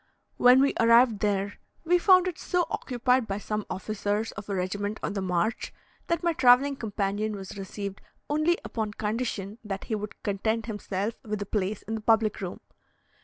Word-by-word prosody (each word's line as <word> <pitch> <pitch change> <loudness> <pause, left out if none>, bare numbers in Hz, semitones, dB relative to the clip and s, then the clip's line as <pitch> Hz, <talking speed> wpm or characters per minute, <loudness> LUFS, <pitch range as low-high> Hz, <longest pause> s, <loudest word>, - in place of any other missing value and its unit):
When 250 +1 +7
we 280 - +3
arrived 230 -1 +5
there, 200 -1 -1 0.3
we 355 +2 +4
found 370 0 +6
it 355 -2 -4
so 360 -1 0
occupied 250 -1 +1
by 195 - -2
some 210 0 -4
officers 205 +2 -2
of 210 0 -9
a 200 - -1
regiment 205 +3 -2
on - - -2
the 200 - -2
march, 185 +5 -1 0.4
that 335 0 0
my 340 -1 +2
travelling 275 -2 +5
companion 210 -1 -2
was 195 -1 -8
received 200 0 -6 0.3
only 310 +4 +2
upon 215 -2 -3
condition 215 -1 -3
that 195 -3 -5
he - - -4
would 210 -1 -5
content 220 +2 -1
himself 205 -1 -3
with 215 -2 -3
a - - -10
place 200 0 -2
in 225 - -5
the 220 - -3
public 220 -1 +2
room. 185 -2 -5
215 Hz, 175 wpm, -27 LUFS, 200-245 Hz, 0.4 s, When